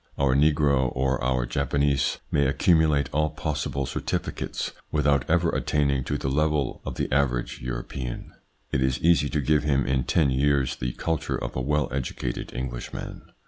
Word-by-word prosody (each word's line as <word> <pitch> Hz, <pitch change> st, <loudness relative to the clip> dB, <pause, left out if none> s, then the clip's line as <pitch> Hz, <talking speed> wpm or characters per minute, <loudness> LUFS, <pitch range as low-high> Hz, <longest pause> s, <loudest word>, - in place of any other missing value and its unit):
Our 70 Hz, -2 st, +3 dB
negro 70 Hz, -2 st, +3 dB
or 65 Hz, 0 st, 0 dB
our 65 Hz, -1 st, +1 dB
Japanese 70 Hz, +2 st, +1 dB
may 70 Hz, -2 st, +3 dB
accumulate 75 Hz, -1 st, +3 dB
all 75 Hz, +1 st, +2 dB
possible 75 Hz, -2 st, -2 dB
certificates -, -, -3 dB, 0.2 s
without 70 Hz, -3 st, +2 dB
ever -, -, +3 dB
attaining 70 Hz, -3 st, 0 dB
to 75 Hz, -, -1 dB
the 65 Hz, -, -4 dB
level 75 Hz, 0 st, 0 dB
of -, -, -5 dB
the -, -, -1 dB
average 65 Hz, -3 st, 0 dB
European. 60 Hz, +1 st, -5 dB, 0.4 s
It 65 Hz, -, +1 dB
is 65 Hz, 0 st, +1 dB
easy 80 Hz, -3 st, +4 dB
to 75 Hz, -, 0 dB
give 75 Hz, +2 st, +2 dB
him 70 Hz, -3 st, +2 dB
in 65 Hz, 0 st, 0 dB
ten 75 Hz, -5 st, +2 dB
years 70 Hz, -1 st, +2 dB
the 60 Hz, 0 st, -3 dB
culture 80 Hz, -1 st, -2 dB
of -, -, -5 dB
a 65 Hz, -, -1 dB
well 75 Hz, +2 st, +1 dB
educated 65 Hz, -2 st, -3 dB
Englishman. 60 Hz, -1 st, -6 dB
70 Hz, 160 wpm, -26 LUFS, 65-75 Hz, 0.4 s, easy